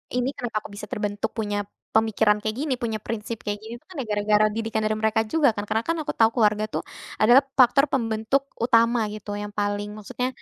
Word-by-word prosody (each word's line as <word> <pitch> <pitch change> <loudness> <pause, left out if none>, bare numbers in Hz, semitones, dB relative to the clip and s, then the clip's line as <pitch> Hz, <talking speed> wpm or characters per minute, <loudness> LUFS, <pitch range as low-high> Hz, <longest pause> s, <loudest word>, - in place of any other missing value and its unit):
ini 250 +1 +1
kenapa 230 -3 -3
aku - - -9
bisa 210 +1 -7
terbentuk 205 -1 -2
punya 205 -2 -2 0.3
pemikiran 220 -1 +3
kayak 215 0 -2
gini, 290 -3 0
punya 225 -3 -3
prinsip 225 0 -4
kayak 205 0 -1
gini, 225 +1 -8
tuh, - - -39
kan 370 - -12
ya - - -5
gara-gara 210 +1 +3
didikan 225 0 -2
dari 215 - +1
mereka 220 0 +2
juga 285 +4 +3
kan, 205 - -2
karena 225 - +1
kan 330 - 0
aku - - -3
tau 225 0 +6
keluarga, 215 -2 +3
tuh, - - -2 0.3
adalah 240 +5 +6 0.2
faktor 260 +3 +6
pembentuk 225 +1 0 0.2
utama, 230 0 +4
gitu, 210 -1 -6
yang 210 - -5
paling 205 0 -1
maksudnya 250 +4 -3
220 Hz, 205 wpm, -24 LUFS, 210-235 Hz, 0.3 s, tau